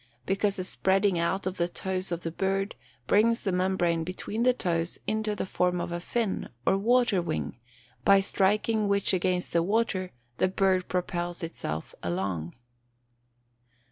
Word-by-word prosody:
_ -, -, -31 dB, 0.2 s
Because 195 Hz, +1 st, +1 dB
the 185 Hz, -, -3 dB
spreading 190 Hz, 0 st, +2 dB
out 180 Hz, +3 st, 0 dB
of 185 Hz, 0 st, -2 dB
the 170 Hz, -, +1 dB
toes 185 Hz, +1 st, -3 dB
of 170 Hz, 0 st, -3 dB
the 165 Hz, -, -2 dB
bird 195 Hz, +3 st, -1 dB, 0.3 s
brings 230 Hz, -, +3 dB
the 195 Hz, -, 0 dB
membrane 180 Hz, -2 st, +1 dB
between 185 Hz, +5 st, -4 dB
the 250 Hz, +1 st, +5 dB
toes 170 Hz, -7 st, -1 dB
into 215 Hz, 0 st, -1 dB
the -, -, -2 dB
form 180 Hz, -1 st, 0 dB
of 175 Hz, -, -3 dB
a 175 Hz, -, -2 dB
fin, 220 Hz, +3 st, -2 dB, 0.2 s
or -, -, +4 dB
water 230 Hz, -1 st, +3 dB
wing, 75 Hz, -, -3 dB, 0.4 s
by 200 Hz, -1 st, +7 dB
striking 210 Hz, +3 st, +1 dB
which 200 Hz, -1 st, +2 dB
against 180 Hz, 0 st, 0 dB
the 170 Hz, -, +4 dB
water, 195 Hz, -1 st, 0 dB, 0.3 s
the -, -, +4 dB
bird 185 Hz, -1 st, +2 dB
propels 175 Hz, -1 st, -2 dB
itself 80 Hz, -, -5 dB
along. 85 Hz, -2 st, -2 dB
185 Hz, 160 wpm, -28 LUFS, 175-200 Hz, 0.4 s, by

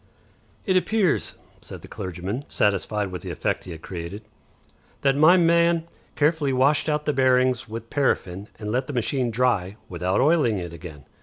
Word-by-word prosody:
"It 190 Hz, -4 st, +1 dB
appears," 195 Hz, 0 st, +1 dB, 0.3 s
said -, -, -9 dB
the -, -, -10 dB
clergyman, 95 Hz, +7 st, -5 dB
satisfied 105 Hz, 0 st, 0 dB
with 90 Hz, -, -6 dB
the -, -, -7 dB
effect -, -, -2 dB
he 90 Hz, -, -8 dB
had 80 Hz, -1 st, -9 dB
created, 90 Hz, +4 st, -7 dB, 0.8 s
"that 135 Hz, -1 st, +3 dB
my 160 Hz, +5 st, +6 dB
man 170 Hz, -1 st, +3 dB, 0.3 s
carefully 150 Hz, -1 st, +2 dB
washed 140 Hz, +4 st, +2 dB
out 150 Hz, 0 st, -1 dB
the 150 Hz, -, +1 dB
bearings 130 Hz, -2 st, +2 dB
with 115 Hz, +1 st, -7 dB
paraffin, 100 Hz, -8 st, -1 dB
and 105 Hz, -1 st, -5 dB
let 130 Hz, +3 st, -1 dB
the 145 Hz, -, -5 dB
machine 125 Hz, +1 st, 0 dB
dry 110 Hz, -5 st, 0 dB
without 90 Hz, +1 st, -1 dB
oiling 145 Hz, -6 st, +3 dB
it 85 Hz, -2 st, -6 dB
again. 80 Hz, -4 st, -10 dB
125 Hz, 165 wpm, -24 LUFS, 95-150 Hz, 0.8 s, my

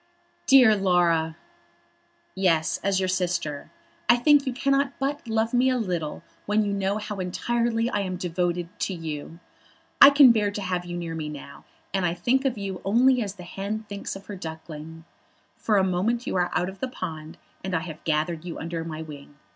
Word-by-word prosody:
"Dear 255 Hz, -6 st, +7 dB
Laura!" 170 Hz, -4 st, +2 dB, 1.0 s
"Yes; 170 Hz, -4 st, +1 dB
as 195 Hz, -1 st, +2 dB
your 190 Hz, -, 0 dB
sister. 175 Hz, -5 st, -2 dB, 0.4 s
I 240 Hz, -, +8 dB
think 285 Hz, +3 st, +4 dB
you -, -, +1 dB
cannot 275 Hz, +2 st, +1 dB
but 275 Hz, -1 st, -3 dB
love 225 Hz, +1 st, 0 dB
me 250 Hz, +1 st, +4 dB
a 255 Hz, -, +1 dB
little 175 Hz, -9 st, -3 dB, 0.2 s
when 210 Hz, +1 st, +2 dB
you 200 Hz, -, -1 dB
know 200 Hz, +1 st, 0 dB
how 210 Hz, -1 st, -5 dB
entirely 230 Hz, +5 st, 0 dB
I 210 Hz, -, -1 dB
am 185 Hz, -2 st, -2 dB
devoted 175 Hz, 0 st, -1 dB
to 190 Hz, -, -2 dB
you. 160 Hz, -1 st, -6 dB, 0.6 s
I 280 Hz, -, +12 dB
can 280 Hz, -3 st, +8 dB
bear 210 Hz, -3 st, +2 dB
to 205 Hz, 0 st, -5 dB
have 180 Hz, -1 st, -2 dB
you 175 Hz, 0 st, -5 dB
near 170 Hz, -1 st, -4 dB
me 155 Hz, -2 st, -4 dB
now 140 Hz, -1 st, -10 dB, 0.3 s
and 180 Hz, -3 st, 0 dB
think 260 Hz, +9 st, +1 dB
of 255 Hz, -4 st, 0 dB
you 195 Hz, -3 st, -5 dB
only 245 Hz, +5 st, +4 dB
as 200 Hz, -2 st, -4 dB
the 180 Hz, -, -10 dB
hen 200 Hz, +4 st, -4 dB
thinks 200 Hz, -1 st, -5 dB
of 195 Hz, 0 st, -10 dB
her 205 Hz, -, -7 dB
duckling. 160 Hz, -1 st, -8 dB, 0.5 s
For 215 Hz, -2 st, +1 dB
a 190 Hz, -, +4 dB
moment 195 Hz, +7 st, 0 dB
you -, -, -3 dB
are 180 Hz, -1 st, +1 dB
out 180 Hz, -, +1 dB
of 190 Hz, +1 st, -8 dB
the 260 Hz, -, -2 dB
pond, 160 Hz, -9 st, -7 dB, 0.3 s
and 190 Hz, -1 st, -2 dB
I 165 Hz, -, 0 dB
have 160 Hz, -2 st, -8 dB
gathered 160 Hz, +1 st, -1 dB
you 175 Hz, -2 st, -6 dB
under 165 Hz, 0 st, -4 dB
my 160 Hz, -1 st, -6 dB
wing. 145 Hz, -2 st, -11 dB
190 Hz, 195 wpm, -25 LUFS, 165-225 Hz, 1.0 s, I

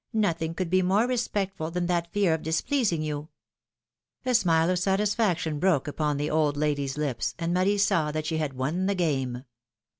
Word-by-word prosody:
Nothing 165 Hz, -6 st, 0 dB
could 180 Hz, -2 st, -3 dB
be 185 Hz, 0 st, +4 dB
more 195 Hz, +5 st, +3 dB
respectful 200 Hz, -9 st, -2 dB
than 175 Hz, +1 st, -2 dB
that 170 Hz, -1 st, -1 dB
fear 200 Hz, -5 st, +2 dB
of 160 Hz, -, -2 dB
displeasing 170 Hz, -, 0 dB
you! 150 Hz, 0 st, -4 dB, 0.5 s
" -, -, -48 dB
A 255 Hz, -, +1 dB
smile 170 Hz, -6 st, +3 dB
of 180 Hz, -, +1 dB
satisfaction 195 Hz, -5 st, +1 dB
broke 165 Hz, -6 st, +2 dB
upon 150 Hz, 0 st, -1 dB
the 145 Hz, +1 st, -1 dB
old 150 Hz, -2 st, +1 dB
lady's 145 Hz, -2 st, -1 dB
lips, 140 Hz, -6 st, -2 dB
and 170 Hz, 0 st, -1 dB
Marie 190 Hz, +3 st, +2 dB
saw 190 Hz, -6 st, +2 dB
that 155 Hz, 0 st, -3 dB
she 160 Hz, 0 st, -1 dB
had 155 Hz, -3 st, -2 dB
won 155 Hz, +9 st, -1 dB
the 200 Hz, -, +1 dB
game. 135 Hz, -8 st, -1 dB
165 Hz, 185 wpm, -27 LUFS, 150-190 Hz, 0.5 s, be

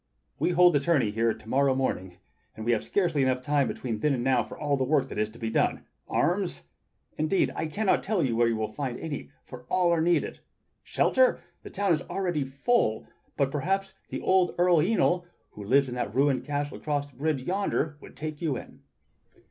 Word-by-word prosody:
We -, -, +2 dB
hold 175 Hz, -1 st, +5 dB
a -, -, +5 dB
tourney 140 Hz, -7 st, +2 dB
here 115 Hz, +2 st, +1 dB
to 110 Hz, -, -10 dB
morrow 135 Hz, +2 st, +2 dB
morning, 95 Hz, -9 st, -2 dB, 0.4 s
and 110 Hz, -, -7 dB
we 120 Hz, -, +2 dB
have 115 Hz, -, +1 dB
scarcely 170 Hz, -8 st, +1 dB
time 130 Hz, +2 st, +1 dB
enough -, -, -3 dB
between 115 Hz, -4 st, -4 dB
then 145 Hz, +3 st, +2 dB
and 120 Hz, -, -3 dB
now 130 Hz, -2 st, +3 dB
for -, -, -10 dB
all 145 Hz, -1 st, 0 dB
the 135 Hz, -, 0 dB
work 135 Hz, 0 st, +2 dB
there 105 Hz, -, -5 dB
is 105 Hz, 0 st, 0 dB
to 110 Hz, -, -14 dB
be 115 Hz, -2 st, -3 dB
done. -, -, 0 dB, 0.2 s
Arms? 180 Hz, -, 0 dB, 0.6 s
Indeed 155 Hz, +5 st, +2 dB
I 160 Hz, -, -2 dB
cannot 200 Hz, +5 st, +1 dB
tell 200 Hz, -3 st, 0 dB
you 120 Hz, -4 st, 0 dB
where 120 Hz, 0 st, +3 dB
you 115 Hz, -, +1 dB
will 110 Hz, -1 st, -3 dB
find 130 Hz, 0 st, -4 dB
any, 155 Hz, -4 st, -5 dB, 0.2 s
for 125 Hz, -1 st, -11 dB
all 180 Hz, -2 st, +3 dB
are 170 Hz, -2 st, +2 dB
needed. 175 Hz, +1 st, +1 dB, 0.4 s
Shelter? -, -, +2 dB, 0.2 s
The -, -, -10 dB
town 200 Hz, -2 st, +1 dB
is 155 Hz, -, 0 dB
already 175 Hz, -6 st, -1 dB
full, 135 Hz, -, 0 dB, 0.3 s
but 135 Hz, -1 st, +1 dB
perhaps 190 Hz, +6 st, -1 dB, 0.2 s
the -, -, -4 dB
old 185 Hz, -2 st, +2 dB
Earl 175 Hz, 0 st, +4 dB
Yniol 180 Hz, -1 st, +2 dB, 0.3 s
who 105 Hz, -, -9 dB
lives 135 Hz, +6 st, +3 dB
in 125 Hz, -, -5 dB
that 125 Hz, 0 st, -3 dB
ruined 135 Hz, -2 st, +2 dB
castle 145 Hz, 0 st, -3 dB
across 145 Hz, -1 st, -2 dB
the 125 Hz, -, -24 dB
bridge 145 Hz, -2 st, -1 dB
yonder 175 Hz, -4 st, -1 dB
would -, -, -14 dB
take 155 Hz, -1 st, -5 dB
you 150 Hz, -6 st, 0 dB
in." -, -, -11 dB
145 Hz, 210 wpm, -27 LUFS, 125-175 Hz, 0.6 s, hold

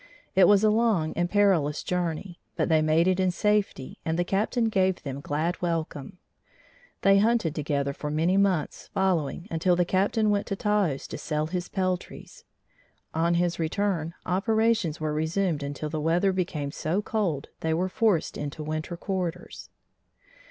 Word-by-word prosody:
It 190 Hz, -2 st, +6 dB
was 205 Hz, 0 st, +5 dB
a 215 Hz, -, +5 dB
long 215 Hz, -8 st, +2 dB
and 175 Hz, +1 st, -1 dB
perilous 180 Hz, -8 st, +2 dB
journey, 175 Hz, 0 st, -3 dB, 0.2 s
but -, -, 0 dB
they 160 Hz, -1 st, +4 dB
made 155 Hz, +3 st, +3 dB
it 185 Hz, 0 st, +2 dB
in 185 Hz, -1 st, +3 dB
safety 205 Hz, -7 st, -1 dB
and 160 Hz, 0 st, -1 dB
the 175 Hz, -, +2 dB
Captain 215 Hz, +6 st, 0 dB
gave 190 Hz, -4 st, +1 dB
them 140 Hz, -1 st, -5 dB
glad 155 Hz, +5 st, -2 dB
welcome. 165 Hz, -1 st, -3 dB, 0.9 s
They 195 Hz, 0 st, +6 dB
hunted 220 Hz, -7 st, +2 dB
together 140 Hz, -2 st, -1 dB
for 150 Hz, -, -5 dB
many 160 Hz, +5 st, +1 dB
months 195 Hz, -6 st, 0 dB
following 180 Hz, -3 st, 0 dB
until 170 Hz, +2 st, +2 dB
the 175 Hz, 0 st, +2 dB
Captain 210 Hz, +4 st, +1 dB
went 200 Hz, -1 st, 0 dB
to 195 Hz, -, -2 dB
Taos 200 Hz, -9 st, 0 dB
to -, -, -7 dB
sell 150 Hz, 0 st, -1 dB
his 180 Hz, +2 st, -4 dB
peltries. 185 Hz, -2 st, -4 dB, 0.7 s
On 170 Hz, +1 st, +2 dB
his 175 Hz, 0 st, 0 dB
return, 170 Hz, -1 st, -1 dB
operations 220 Hz, -3 st, +1 dB
were 155 Hz, -1 st, -2 dB
resumed 160 Hz, +1 st, 0 dB
until 145 Hz, +2 st, -4 dB
the 155 Hz, -, -2 dB
weather 175 Hz, +5 st, +2 dB
became 155 Hz, -6 st, -2 dB
so 170 Hz, +8 st, -1 dB
cold 180 Hz, -12 st, -2 dB
they 160 Hz, -, -1 dB
were 175 Hz, +4 st, +1 dB
forced 190 Hz, -3 st, +1 dB
into 145 Hz, +1 st, -5 dB
winter 155 Hz, +3 st, -4 dB
quarters. 180 Hz, -2 st, -4 dB
175 Hz, 160 wpm, -26 LUFS, 155-195 Hz, 0.9 s, It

